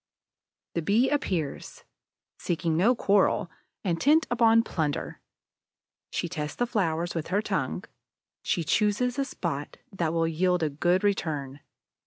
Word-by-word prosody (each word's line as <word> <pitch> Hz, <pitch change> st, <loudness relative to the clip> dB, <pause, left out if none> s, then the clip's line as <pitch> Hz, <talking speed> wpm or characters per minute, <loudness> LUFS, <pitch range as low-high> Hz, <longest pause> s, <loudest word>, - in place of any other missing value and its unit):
The 170 Hz, -, -1 dB
Bee 220 Hz, -, +2 dB
appears, 180 Hz, -, -2 dB, 0.6 s
seeking 165 Hz, -1 st, -1 dB
no 215 Hz, +10 st, +4 dB
quarrel, 200 Hz, -3 st, +2 dB, 0.3 s
intent 280 Hz, -, +3 dB
upon 230 Hz, -1 st, +5 dB
plunder. 155 Hz, -9 st, -3 dB, 0.9 s
She -, -, -2 dB
tests 150 Hz, -4 st, -4 dB
the 245 Hz, -, 0 dB
flowers 175 Hz, -7 st, -1 dB
with 165 Hz, -2 st, -3 dB
her 195 Hz, +4 st, +1 dB
tongue; -, -, -2 dB, 0.6 s
she 175 Hz, -, 0 dB
chooses 215 Hz, -, +1 dB
a 275 Hz, -, +1 dB
spot 150 Hz, -, -4 dB
that 170 Hz, -5 st, -1 dB
will 165 Hz, 0 st, +1 dB
yield 180 Hz, +2 st, +1 dB
a 155 Hz, -, 0 dB
good 175 Hz, +6 st, +1 dB
return. 150 Hz, -9 st, -1 dB
180 Hz, 130 wpm, -27 LUFS, 160-210 Hz, 0.9 s, upon